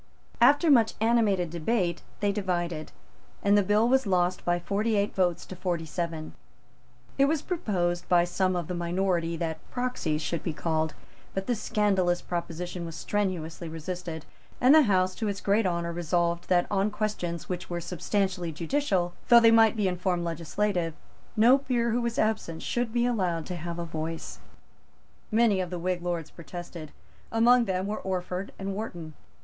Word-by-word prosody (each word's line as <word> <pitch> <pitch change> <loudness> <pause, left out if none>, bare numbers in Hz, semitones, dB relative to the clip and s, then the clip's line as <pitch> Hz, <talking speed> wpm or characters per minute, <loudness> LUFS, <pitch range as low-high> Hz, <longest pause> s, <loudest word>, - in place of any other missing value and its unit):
After 295 +3 +6
much 230 -5 +4
animated 215 -7 +2
debate, 175 +1 0 0.2
they 205 -1 +2
divided; 175 -5 -2 0.5
and 200 0 +4
the 205 - +5
bill 210 +3 +3
was 265 -2 +3
lost 180 -1 +1
by 175 0 +1
forty 205 +5 0
eight 200 0 +1
votes 180 -3 0
to 185 - -8
forty 175 -2 -2
seven. 165 -1 -4 0.9
It 275 - +6
was 305 +1 0
proposed 180 - -1
by 175 -1 +5
some 185 +1 0
of 175 -3 -2
the 180 - -3
minority 175 -1 0
that 160 -1 -3
proxies 245 -12 -2
should 170 - -2
be 165 - -3
called; 160 0 -1 0.4
but 195 0 -2
this 240 -4 -1
scandalous 190 -5 +1
proposition 175 0 -4
was 165 -1 -6
strenuously 175 -5 -2
resisted; 165 0 -6 0.3
and 255 +3 +6
the 315 - +8
House, 185 -7 +2
to 220 - -3
its 200 -1 -2
great 205 +1 +2
honour, 170 -1 -1
resolved 170 0 0
that 175 -1 +4
on 200 +1 +2
questions 205 -6 -3
which 180 -1 -5
were 175 -1 -2
substantially 180 0 -1
judicial, 175 - 0
though 235 - +9
they 230 -1 +6
might 225 0 +6
be 210 -3 +1
in 180 -1 -1
form 180 -1 0
legislative, 170 +1 -1 0.4
no 245 +5 +6
peer 240 -4 0
who 240 +2 +1
was 235 -1 -2
absent 215 -7 -1
should 240 -2 -1
be 240 +1 +1
allowed 180 -9 0
to 180 - -5
have 170 0 -5
a 170 - -3
voice. 160 0 -5 0.9
Many 215 -3 +3
of 180 - -3
the 180 - -4
Whig 180 +1 -1
Lords 170 -3 -3
protested. 170 -1 -8 0.4
Among 235 +2 +5
them 185 -1 -1
were 210 +2 -3
Orford 185 0 -3
and 195 0 -4
Wharton. 175 -7 -6
185 Hz, 170 wpm, -28 LUFS, 170-215 Hz, 0.9 s, though